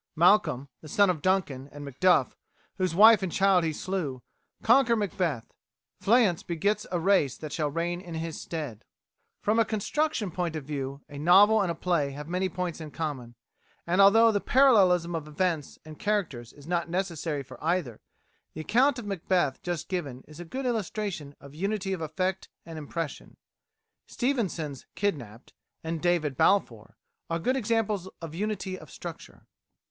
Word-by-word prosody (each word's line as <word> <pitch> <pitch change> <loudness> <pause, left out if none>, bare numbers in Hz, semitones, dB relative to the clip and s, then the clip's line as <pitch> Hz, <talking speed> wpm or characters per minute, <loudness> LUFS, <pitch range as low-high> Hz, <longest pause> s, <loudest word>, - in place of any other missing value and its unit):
Malcolm, 160 -6 +3
the 155 - -11
son 200 +5 +4
of 160 -5 -5
Duncan, 145 -8 0
and 145 0 -9
Macduff, 180 +7 +2 0.4
whose 185 -3 0
wife 220 +2 +8
and 190 -2 -2
child 195 -1 +3
he 160 - 0
slew, 155 -6 -4 0.4
conquer 235 0 +5
Macbeth; 180 - -2 0.5
Fleance 210 -6 +3
begets 200 +5 -1
a 175 - 0
race 170 -7 +2
that 155 -2 -7
shall 150 -3 0
reign 170 +3 -2
in 175 -3 -8
his 160 0 -4
stead."[65:A] 150 -10 -9
From 215 +2 +3
a - - +6
construction 225 - -1
point 170 -2 -2
of 155 -3 -5
view, 140 -1 -5
a 145 - -9
novel 200 +7 +6
and 190 - 0
a - - -4
play 170 -6 0
have 145 +2 -8
many 185 +2 -1
points 175 -2 -4
in 155 - -7
common; 140 -7 -5 0.5
and 180 +3 +3
although 225 +3 +7
the 205 -2 0
parallelism 190 -10 +4
of 160 -2 -4
events 155 -1 -2
and 155 -1 -11
characters 170 - -2
is 145 -1 -16
not 170 0 -1
necessary 165 -5 -2
for 130 +2 -13
either, 160 -9 -1 0.5
the 155 - -4
account 255 - +3
of 240 - -6
Macbeth 180 -7 0
just 175 -2 -4
given 145 -9 -4
is 155 +2 -13
a 175 - -7
good 260 +10 -5
illustration 205 - -3
of 140 0 -13
unity 195 +3 -2
of 180 - -4
effect 185 +4 -2 0.2
and 165 -1 -7
impression. 155 +1 -6 0.7
Stevenson's 190 - -2
"Kidnapped" 130 - -3 0.3
and 165 -1 -3
"David 170 -6 +1
Balfour" 200 0 +1 0.3
are 165 - 0
good 250 +10 0
examples 215 -6 -1
of 165 -2 -8
unity 190 0 -3
of - - -14
structure. - - -10
175 Hz, 165 wpm, -28 LUFS, 150-200 Hz, 0.7 s, wife